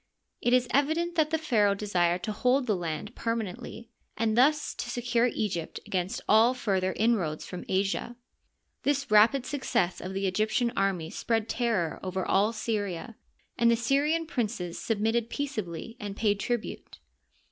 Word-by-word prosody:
It 240 - +1
is 250 0 +4
evident 315 +5 +1
that 315 -3 +2
the 320 - +1
pharaoh 215 -10 +2
desired 180 -4 0
to 215 - -2
hold 250 +5 +2
the 215 -4 +1
land 175 +5 -4
per 230 0 -1
manently, 225 +2 -6 0.3
and 220 -1 +1
thus 295 +5 +3
to 240 - -5
secure 240 0 +1
Egypt 175 -7 -3
against 185 0 -2
all 225 +4 +5
further 190 -6 0
in 230 +2 +3
roads 155 -5 -3
from 180 - -7
Asia. 195 +5 -1 0.7
This 280 -3 0
rapid 230 +5 +5
success 240 -10 -1
of 190 +1 -6
the 195 0 -1
Egyptian 215 +5 +1
army 185 -5 0
spread 225 -2 -1
terror 220 -11 0
over 185 0 -3
all 205 +3 +3
Syria, 215 -2 -3 0.4
and 235 0 +5
the 235 - +5
Syrian 285 +7 +1
princes 210 - -3
submitted 225 +1 0
peaceably 225 - -4
and 205 -1 -6
paid 205 -2 +1
tribute. 240 0 -4
220 Hz, 160 wpm, -28 LUFS, 195-245 Hz, 0.7 s, all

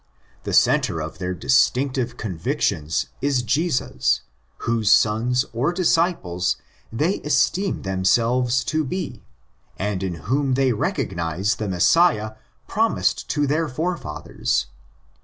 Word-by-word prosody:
The - - -3
centre 80 - +3
of 80 +1 -6
their 90 0 -3
distinctive 125 - +1
convictions 80 -5 -1 0.2
is 140 -3 +1
Jesus, 145 - 0 0.4
whose 115 -3 +2
sons 115 +4 +3
or 125 +8 +1
disciples 165 - +1 0.4
they 155 - 0
esteem 185 +6 0
themselves 120 +7 +1
to 155 +1 0
be, 180 +7 -4 0.6
and 100 -1 -2
in 95 -2 -2
whom 135 +2 +1
they 130 -2 +2
recognise 90 -2 -1
the 105 -2 -3
Messiah 110 - +3 0.4
promised 225 +2 0
to 145 -1 +1
their 155 +3 0
fore 165 +7 -1
fathers. 75 - -2
125 Hz, 115 wpm, -22 LUFS, 95-150 Hz, 0.6 s, centre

